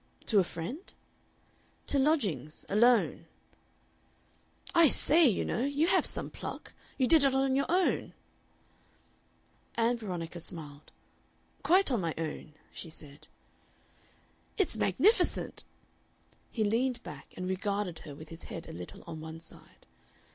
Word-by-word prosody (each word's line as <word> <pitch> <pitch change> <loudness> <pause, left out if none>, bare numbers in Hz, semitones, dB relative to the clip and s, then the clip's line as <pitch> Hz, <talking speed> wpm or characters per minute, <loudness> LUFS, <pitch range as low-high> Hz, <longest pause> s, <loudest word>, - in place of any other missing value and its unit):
"To 210 - +4
a - - +5
friend?" 180 - -6 0.9
"To 280 - +1
lodgings 200 - 0
alone." 235 +4 +3 1.5
"I 335 -1 +7
say, 310 +3 +5
you 220 - +1
know, 235 - -1
you 285 +3 +1
have 350 - +3
some - - -2
pluck. - - -7 0.2
You 260 - +3
did 315 +2 +5
it 270 -1 +3
on 270 0 +2
your 275 - +1
own?" 360 +2 +1 1.6
Ann 235 +1 +2
Veronica 175 -5 -5
smiled. 150 -4 -7 0.7
"Quite 370 -2 +4
on 235 -6 +1
my 165 -2 -2
own," 155 -1 -5 0.2
she 165 - -7
said. 145 -2 -11 1.3
"It's 390 - +1
magnificent!" 440 +3 +2 0.8
He 220 - -1
leaned 235 +3 0
back 150 -2 -10
and 180 0 -3
regarded 200 -2 -2
her 145 -3 -10
with 155 +2 -11
his 165 0 -9
head 165 - -7
a - - -8
little 90 +1 -9
on 160 - -7
one 160 +1 -8
side. 165 - -16
210 Hz, 135 wpm, -31 LUFS, 165-270 Hz, 1.6 s, I